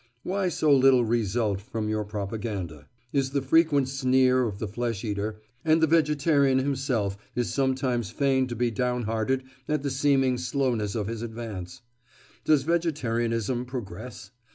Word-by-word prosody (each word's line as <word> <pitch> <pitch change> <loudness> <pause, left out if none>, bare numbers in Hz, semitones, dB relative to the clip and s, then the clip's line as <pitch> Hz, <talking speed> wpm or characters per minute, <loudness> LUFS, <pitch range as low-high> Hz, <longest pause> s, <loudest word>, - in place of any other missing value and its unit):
"Why 190 0 0
so 155 -4 +3
little 130 -2 +5
result 110 -3 0
from 110 -1 -4
your 110 0 -1
propaganda?" 100 -7 -5 0.3
is 135 -2 +1
the 140 - +1
frequent 145 -1 +3
sneer 130 -1 +3
of 100 -3 -5
the 110 - -3
flesh 115 0 -3
eater, 105 0 -3 0.2
and 160 0 +4
the 160 - +5
vegetarian 150 -3 +3
himself 130 -7 0 0.2
is 120 -1 -1
sometimes 130 -5 0
fain 130 +1 +1
to 120 - -5
be 120 +1 0
down 125 +1 -1
hearted 115 +4 -1 0.2
at 150 -2 -1
the 140 - -1
seeming 135 -2 +2
slowness 120 -5 -1
of 105 -3 -1
his 115 +1 -4
advance. 115 -2 -7 0.6
Does 150 -3 +4
vegetarianism 125 -8 0
progress? 110 -3 -7
125 Hz, 150 wpm, -26 LUFS, 110-135 Hz, 0.6 s, little